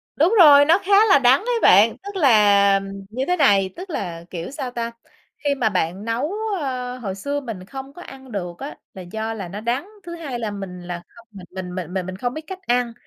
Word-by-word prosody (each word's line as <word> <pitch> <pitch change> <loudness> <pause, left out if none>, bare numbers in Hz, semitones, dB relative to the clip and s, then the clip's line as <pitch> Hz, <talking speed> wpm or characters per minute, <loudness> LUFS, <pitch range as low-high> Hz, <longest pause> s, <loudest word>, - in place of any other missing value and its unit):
Đúng 340 +10 +3
rồi, 290 -4 +9
nó 330 +4 +5
khá 405 +2 +6
là 380 - +7
đắng 260 +1 +5
ấy 475 +2 -1
bạn. 210 +4 +6
Tức 405 0 -8
là 205 - +5 0.3
như 255 +5 -3
thế 360 - +2
này, 200 - +4
tức 370 +3 -9
là, 175 - -5
kiểu, 170 +3 -6
sao 270 -4 -5
ta, 235 -1 -4 0.5
khi 285 -1 +1
mà 235 -5 +1
bạn 185 +1 -2
nấu, 245 +10 -2 0.3
ơ, 255 -3 -4
hồi 200 -6 -5
xưa 285 +9 -3
mình 220 -8 -7
không 270 +5 -9
có 350 - -12
ăn 265 -1 -12
được 175 -4 -5
á 280 - -7 0.2
là 190 - -9
do 220 +5 -4
là 200 -5 -6
nó 200 +4 -7
đắng, 245 - -2 0.2
thứ 340 -1 -7
hai 285 -8 -5
là 220 -3 -3
mình 195 -3 -7
là 175 -1 -6
không 235 0 -19
mình 195 -4 -11
mình 180 -1 -6
mình 180 -1 -5
mình 190 -2 -2
mình 185 0 -6
không 245 +3 -2
biết 310 - -6
cách 380 -1 -7
ăn. 245 -1 +1
235 Hz, 235 wpm, -22 LUFS, 195-285 Hz, 0.5 s, rồi